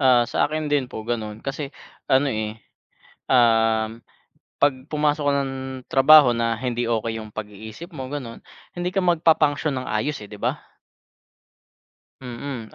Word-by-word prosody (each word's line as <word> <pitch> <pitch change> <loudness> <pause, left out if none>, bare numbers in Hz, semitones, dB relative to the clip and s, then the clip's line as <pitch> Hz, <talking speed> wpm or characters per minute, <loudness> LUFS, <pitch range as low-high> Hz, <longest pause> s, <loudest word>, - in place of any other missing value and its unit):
ah, 125 -3 +5
sa 120 - 0
akin 155 +1 -2
din 135 -3 +1
po 110 -3 -7
gano'n 110 -2 -4
kasi 140 +1 -4 0.4
ano, 135 +2 +4
eh, 110 0 -3 0.7
um, 115 -2 +3 0.6
'pag 145 -1 +4 0.2
pumasok 150 0 +1
ka - - +2
ng 135 - -5 0.3
trabaho 135 -2 +7
na 115 -1 0
hindi 120 -1 -2
okey 115 -1 -1
'yung 110 - -9
pag-iisip 110 - -9
mo, 130 -3 -6
gano'n 130 -6 -6 0.3
hindi 175 0 -2
ka 190 0 -1
magpa-function 155 -4 +2
ng 130 - -5
ayos, 110 +7 -1
eh, - - -16
'di 105 - -11
ba? - - 0 1.6
Mm 125 -2 -7
125 Hz, 145 wpm, -23 LUFS, 110-145 Hz, 1.6 s, trabaho